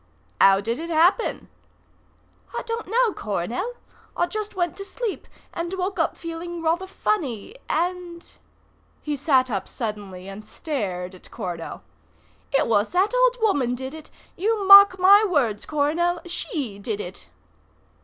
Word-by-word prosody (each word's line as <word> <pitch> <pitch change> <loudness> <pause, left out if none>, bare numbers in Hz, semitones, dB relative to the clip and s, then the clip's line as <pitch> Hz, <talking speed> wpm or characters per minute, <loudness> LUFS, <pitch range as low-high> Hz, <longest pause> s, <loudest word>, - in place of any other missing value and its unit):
"How 195 0 +6
did 230 +5 -2
it 335 +1 -5
happen?" 340 +8 +2 1.1
"I - - -3
don't 460 -1 -4
know, 460 +1 +2
Coronel. 235 - -3 0.4
I 345 - +3
just 425 +2 -5
went 350 -3 -1
to 395 - -6
sleep, 435 +1 -5 0.3
and 340 0 -4
woke 380 +1 -3
up - - 0
feeling 335 0 -6
rather 340 +4 0
funny, 320 - -2
and 350 0 -2 0.4
" - - -37
He 300 -1 -2
sat 260 -3 +2
up 195 -3 -2
suddenly 205 -5 -6
and 195 +2 -8
stared 200 - -4
at 185 - -15
Coronel. 175 - -6 0.7
"It 275 - +3
was 210 -2 +1
that 385 +6 +2
old - - +3
woman 275 - +2
did 260 +2 -6
it. 315 -1 -10 0.3
You 420 +2 0
mark 395 -1 +10
my 395 +3 +7
words, 275 - 0
Coronel; 320 +4 +1
she 300 - -4
did 205 0 -3
it." 175 - -8
330 Hz, 145 wpm, -24 LUFS, -, 1.1 s, mark